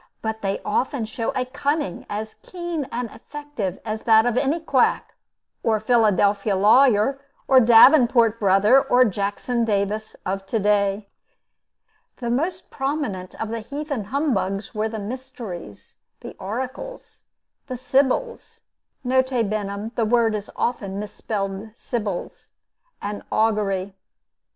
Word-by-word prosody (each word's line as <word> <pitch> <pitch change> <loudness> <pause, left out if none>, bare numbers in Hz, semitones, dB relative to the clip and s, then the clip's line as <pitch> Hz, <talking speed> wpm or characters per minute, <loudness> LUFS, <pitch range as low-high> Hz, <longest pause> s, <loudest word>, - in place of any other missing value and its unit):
But 220 0 -3
they 195 0 -1
often 245 +3 0
show 225 +1 -3
a 255 - 0
cunning 280 - -2
as 215 +1 -4
keen 345 -6 -5
and 245 0 -2
effective 290 -8 -6
as 215 0 -3
that 220 0 +5
of 245 -1 +1
any 285 +6 +1
quack, 320 - +1 0.5
or 220 -1 +1
Philadelphia 210 -3 +2
lawyer, 240 +5 +4 0.3
or 265 - +7
Davenport 235 -1 +6
Brother, 205 +6 +5
or 250 0 +4
Jackson 205 +4 -1
Davis 210 0 -1
of 195 +1 -3
to 225 - 0
day. 205 -1 +1 1.1
The 235 -2 -3
most 340 +8 -2
prominent 270 -10 -3
of 225 - -3
the 230 +1 -3
heathen 280 0 -4
humbugs 215 -6 -1
were 215 +1 -1
the 220 - -5
mysteries, 215 - -8 0.2
the - - -9
oracles, 260 - -6 0.5
the 255 -2 -5
sibyls 275 - 0 0.5
(N. 260 +1 +4
B., 215 -4 -2
the 230 - +1
word 230 -2 +3
is 210 -1 -4
often 200 -5 -2
mis 210 0 -6
spelled 195 0 -4
sybils,) 210 -8 -5 0.5
and 205 0 -4
augury. 200 -3 +1
225 Hz, 125 wpm, -23 LUFS, 205-260 Hz, 1.1 s, or